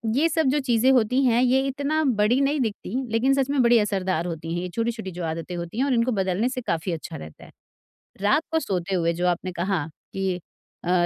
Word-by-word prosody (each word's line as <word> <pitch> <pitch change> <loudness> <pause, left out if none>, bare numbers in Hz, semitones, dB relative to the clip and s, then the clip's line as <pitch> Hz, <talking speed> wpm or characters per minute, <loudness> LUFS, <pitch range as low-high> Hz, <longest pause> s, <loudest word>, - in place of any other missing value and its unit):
ये 315 +5 +3
सब 320 -2 +1
जो 290 +3 +2
चीज़ें 250 -2 +2
होती 250 +1 +3
हैं 240 -1 +4
ये 255 +1 +4
इतना 285 +3 0 0.2
बड़ी 230 +5 +3
नहीं 285 +2 +1
दिखती 225 0 -3 0.2
लेकिन 240 +4 +3
सच 270 -1 +1
में 285 -2 +2
बड़ी 235 0 +6
असरदार 190 -5 0
होती 165 -1 -5
हैं 175 - -2
ये 180 - -4
छोटी-छोटी 230 -4 -2
जो 175 0 -6
आदतें 165 +2 -4
होती 170 +4 -6
हैं 270 - +3
और 280 - +1
इनको 235 +1 +2
बदलने 195 +2 0
से 255 0 -4
काफ़ी 170 -5 -2
अच्छा 165 -2 -5
रहता 75 0 -11
है। - - -16 0.7
रात 210 +10 +3
को 320 - +2
सोते 190 - -2
हुए 170 -1 +1
जो 175 +2 -1
आपने 180 +1 -1
कहा 175 -2 -1 0.3
कि 190 -1 -1 0.5
अ, 175 0 +3
215 Hz, 225 wpm, -24 LUFS, 180-260 Hz, 0.7 s, बड़ी